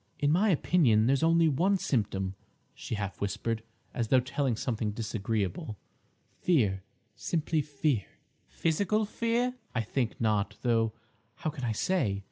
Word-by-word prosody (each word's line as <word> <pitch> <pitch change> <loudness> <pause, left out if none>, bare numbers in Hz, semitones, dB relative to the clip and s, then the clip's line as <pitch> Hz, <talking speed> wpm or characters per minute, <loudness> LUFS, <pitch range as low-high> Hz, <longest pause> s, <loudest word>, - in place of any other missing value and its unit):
"In 145 0 +2
my 195 +7 +3
opinion 140 - +4
there's 135 +3 +3
only 165 0 +4
one 180 +7 +2
symptom," 100 - -1 0.4
she - - -5
half 100 -2 -4
whispered, 105 +3 -1 0.3
as 120 -2 -1
though 130 +3 +5
telling 130 -1 -1
something 110 -1 -2
disagreeable—"fear—simply 115 - -2
fear." 140 -6 0 0.4
"Physical 200 +6 +1
fear?" 235 +3 0 0.2
"I 115 - +2
think 115 +2 -2
not; 105 -2 +1
though 115 -2 +2 0.4
how 155 - -3
can 140 -4 -8
I 115 -2 0
say? 110 - 0
125 Hz, 125 wpm, -30 LUFS, 110-160 Hz, 0.4 s, though